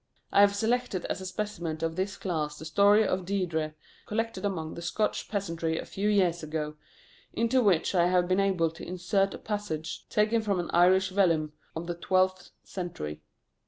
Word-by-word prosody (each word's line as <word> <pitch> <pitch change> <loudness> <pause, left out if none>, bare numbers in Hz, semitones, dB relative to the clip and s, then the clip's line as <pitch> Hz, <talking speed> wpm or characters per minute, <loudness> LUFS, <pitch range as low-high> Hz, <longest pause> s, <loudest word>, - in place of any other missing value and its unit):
I 200 - +6
have 200 0 +5
selected 225 -3 0
as 190 - -3
a 190 - -5
specimen 175 -6 -4
of 165 0 -1
this 190 +2 -2
class 155 -5 -2
the 160 - -9
Story 205 +6 +5
of 185 0 -1
Deirdre, 170 -5 -1 0.3
collected 225 -2 -2
among 165 -6 -2
the 170 - -7
Scotch 210 +5 -1
peasantry 165 -5 -2
a - - -4
few 205 +2 -1
years 180 -5 +2
ago, 155 -1 -3 0.6
into 230 +3 +2
which 190 -7 +2
I 175 -2 +4
have 180 -1 +2
been 185 +1 +2
able 185 -5 +2
to 165 - -11
insert 185 +2 0
a - - -7
passage 205 -7 -4
taken 215 +2 +2
from 200 -4 0
an 175 - -3
Irish 185 +2 +5
vellum 165 -6 +2 0.2
of 160 +1 -4
the 175 - -2
twelfth 185 +1 +1
century. 165 - -6
185 Hz, 180 wpm, -28 LUFS, 165-200 Hz, 0.6 s, I